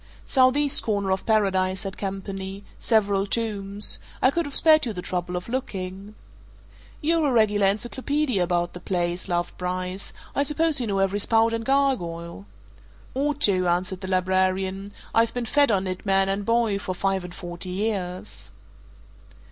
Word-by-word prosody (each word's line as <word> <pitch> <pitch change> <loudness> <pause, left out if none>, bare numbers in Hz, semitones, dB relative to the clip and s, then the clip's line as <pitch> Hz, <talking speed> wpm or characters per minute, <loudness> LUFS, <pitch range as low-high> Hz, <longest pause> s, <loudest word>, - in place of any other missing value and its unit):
"Southeast 275 +2 +3
corner 200 -3 -1
of 190 0 -2
Paradise," 190 -4 +1
said 195 -1 -5
Campany. 195 0 -5 0.2
"Several 200 -3 +2
tombs. 205 -2 +1 0.2
I 255 - +4
could 340 +1 -1
have 285 - -5
spared 310 -1 +7
you 225 - -3
the 180 - -5
trouble 180 0 -3
of 180 - -5
looking." 200 -4 -5 0.9
"You're 325 0 +2
a - - +1
regular 210 -4 +3
encyclopaedia 250 +3 -1
about 175 -1 0
the 180 - -8
place," 175 0 -2
laughed 175 -1 -2
Bryce. 185 +1 -3 0.2
"I - - +1
suppose 300 0 +3
you 235 - -2
know 200 -2 -1
every 195 +1 +1
spout 225 +2 +3
and 230 0 -2
gargoyle!" 170 - -1 0.7
"Ought 285 +2 -1
to," 185 -7 +3
answered 180 +2 -1
the 190 - -5
librarian. 190 +1 0 0.2
"I've 230 +1 +2
been 245 -1 -2
fed 285 +4 +3
on 195 -2 +1
it, 185 -1 -4
man 195 -1 +2
and 195 +2 -2
boy, 230 -3 +2
for 185 -2 -4
five 195 0 0
and 180 0 -9
forty 175 +1 -6
years." 180 - -3
195 Hz, 160 wpm, -24 LUFS, 185-230 Hz, 0.9 s, spared